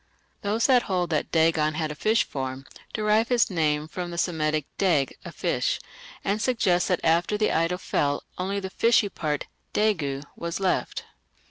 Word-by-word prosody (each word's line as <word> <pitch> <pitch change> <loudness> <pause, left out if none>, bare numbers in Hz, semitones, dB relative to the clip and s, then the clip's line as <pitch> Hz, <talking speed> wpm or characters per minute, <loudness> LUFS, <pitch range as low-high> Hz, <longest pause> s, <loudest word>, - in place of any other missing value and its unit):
Those 215 +3 +1
who 255 -2 +6
hold 180 -6 -1
that 155 - -1
Dagon 160 -2 +3
had 155 -1 -1
a - - -3
fish 215 +9 +2
form 130 -1 -5 0.3
derive 215 +1 +2
his 245 -4 +2
name 155 -3 +1
from 175 +2 -5
the 170 - -6
Semitic 155 -4 0
"dag 160 -8 +2
= - - -28
a - - -6
fish", - - 0 0.4
and 205 +2 0
suggest 200 -9 +2
that 180 -3 +1
after 170 +5 +2
the 215 - +2
idol 165 +2 +1
fell 145 -5 0 0.2
only 195 +2 -1
the 190 -1 -6
fishy 230 -2 +3
part 150 -5 -2 0.3
(dāgo) 155 -11 +1
was 170 +1 -4
left. 190 -1 0
175 Hz, 170 wpm, -26 LUFS, 155-205 Hz, 0.4 s, who